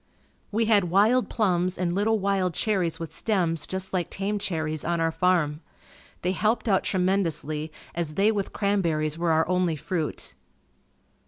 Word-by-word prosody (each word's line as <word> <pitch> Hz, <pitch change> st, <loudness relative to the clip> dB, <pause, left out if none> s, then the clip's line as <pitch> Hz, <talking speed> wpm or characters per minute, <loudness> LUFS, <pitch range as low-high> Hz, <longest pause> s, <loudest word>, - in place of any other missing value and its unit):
We 225 Hz, +2 st, +1 dB
had 210 Hz, -4 st, +4 dB
wild 215 Hz, +8 st, +3 dB
plums 185 Hz, -4 st, +1 dB
and 175 Hz, -2 st, 0 dB
little 215 Hz, +4 st, +2 dB
wild 190 Hz, -3 st, 0 dB
cherries 190 Hz, -7 st, 0 dB
with 165 Hz, -1 st, -6 dB
stems 170 Hz, -8 st, 0 dB
just 190 Hz, 0 st, -3 dB
like 180 Hz, -3 st, -1 dB
tame 205 Hz, +2 st, -2 dB
cherries, 155 Hz, -5 st, -2 dB
on 170 Hz, 0 st, 0 dB
our 165 Hz, 0 st, +1 dB
farm. 165 Hz, -3 st, +1 dB, 0.6 s
They 180 Hz, -, +1 dB
helped 215 Hz, +5 st, 0 dB
out 195 Hz, -3 st, +3 dB
tremendously 165 Hz, -5 st, 0 dB, 0.2 s
as 165 Hz, -3 st, -3 dB
they 205 Hz, +4 st, +4 dB
with 200 Hz, -3 st, -2 dB
cranberries 165 Hz, -6 st, 0 dB
were 170 Hz, 0 st, +1 dB
our 160 Hz, 0 st, +3 dB
only 180 Hz, -2 st, +1 dB
fruit. 160 Hz, +1 st, -3 dB
180 Hz, 155 wpm, -26 LUFS, 165-200 Hz, 0.6 s, had